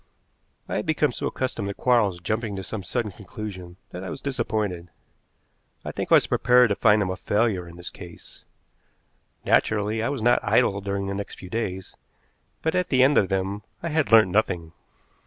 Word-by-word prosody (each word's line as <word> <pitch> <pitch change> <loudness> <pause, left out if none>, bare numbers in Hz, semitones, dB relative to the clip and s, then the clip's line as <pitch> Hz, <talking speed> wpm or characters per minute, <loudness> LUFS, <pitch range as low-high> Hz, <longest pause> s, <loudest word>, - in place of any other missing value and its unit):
I - - -2
had 105 - -3
become 155 -2 +2
so - - -3
accustomed 130 -6 -3
to 100 - -4
Quarles 110 -8 +2
jumping 110 +2 -2
to 95 - -5
some 110 +2 -5
sudden 105 +4 -2
conclusion 95 -2 -8
that 90 - -7
I 95 - -5
was - - -6
disappointed. 110 -10 -2 1.0
I - - -3
think - - -5
I - - +9
was - - +5
prepared 125 0 +4
to 100 - +1
find 105 0 +4
him 95 - -2
a - - -3
failure 105 -3 0
in 85 - -12
this 90 0 -8
case. 90 -3 -13 1.0
Naturally 110 +1 +2
I 115 - 0
was 135 -5 -3
not 120 +1 +4
idle 100 -1 +2
during 100 0 -2
the 100 - -3
next 100 +1 -6
few 90 -1 -11
days, 95 -5 -3 0.7
but 160 - +1
at 180 -1 +1
the 130 -2 +4
end 140 +2 +4
of 95 - 0
them 95 +1 -1 0.2
I 170 - -2
had 155 -4 0
learnt 110 -4 +7
nothing. 90 -5 0
105 Hz, 195 wpm, -25 LUFS, 95-120 Hz, 1.0 s, I